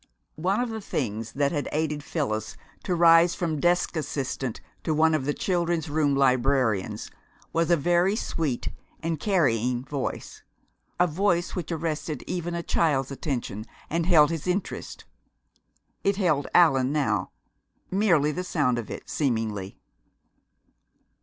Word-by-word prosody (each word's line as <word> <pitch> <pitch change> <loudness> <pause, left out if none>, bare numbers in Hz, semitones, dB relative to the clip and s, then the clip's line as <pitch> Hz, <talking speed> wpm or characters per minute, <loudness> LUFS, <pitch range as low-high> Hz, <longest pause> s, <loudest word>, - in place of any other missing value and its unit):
One 190 +5 +1
of 245 -1 -1
the 220 -1 -5
things 115 - -3
which 140 0 +2
had 145 -3 -2
aided 150 -1 -1
Phyllis 110 -5 -3 0.3
to 180 - 0
rise 165 0 +6
from 160 -4 -2
desk 175 +2 +2
assistant 135 -5 -3 0.2
to 155 - 0
one 160 +1 +4
of 145 -4 0
the 145 - 0
Children's 170 -4 -1
Room 145 -2 +2
librarians 130 -5 +1 0.4
was 165 0 +1
a 170 - +5
very 175 +6 +2
sweet 155 - -2 0.3
and 165 -2 -1
carrying 125 - +1
voice 140 -1 -4 0.6
a 180 - +6
voice 175 +1 0
which 175 -3 -4
arrested 155 -3 -3
even 175 -1 -3
a 170 - -3
child's 140 -7 +1
attention, 130 - -3 0.3
and 165 +1 0
held 160 -4 +6
his 165 0 -4
interest. 180 +2 -3 1.0
It 200 - +2
held 165 -8 +1
Allan 135 -7 +5
now; 110 -11 0 0.6
merely 175 -7 +3
the 180 +4 -3
sound 140 -9 +1
of 115 - -7
it, - - -7
seemingly. 110 -8 -2
155 Hz, 140 wpm, -26 LUFS, 135-175 Hz, 1.0 s, rise